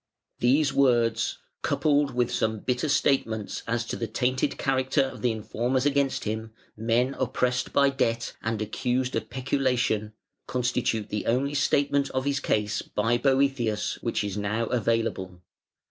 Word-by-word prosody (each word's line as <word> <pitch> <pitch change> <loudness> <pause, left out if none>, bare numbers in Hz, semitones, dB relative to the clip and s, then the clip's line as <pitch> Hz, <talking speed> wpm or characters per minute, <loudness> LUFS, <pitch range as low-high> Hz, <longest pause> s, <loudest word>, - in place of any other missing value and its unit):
These 135 +4 +3
words, 120 -4 +2 0.2
coupled 145 -3 +1
with 125 -1 +1
some 110 -1 0
bitter 125 +4 -1
statements 115 -7 +1
as 115 0 -1
to - - -4
the 115 - -3
tainted 130 +4 0
character 135 +1 +1
of 135 - -6
the 125 - +2
informers 115 +4 -1
against 140 -1 +1
him, 110 +1 -4 0.2
men 115 +4 +1
oppressed 125 0 0
by 140 0 +4
debt 115 -4 -1
and 110 -1 -1
accused 125 +4 -1
of - - -3
peculation, 125 -4 0 0.3
constitute 125 -3 -1
the 105 - -3
only 135 +5 +1
statement 140 0 +2
of 130 +1 0
his 140 0 +1
case 105 -6 0
by 115 +3 0
Boëthius 135 -5 +1
which 115 - -1
is 100 -1 -3
now 105 +3 -1
available. 115 -6 -1
125 Hz, 145 wpm, -26 LUFS, 110-135 Hz, 0.3 s, by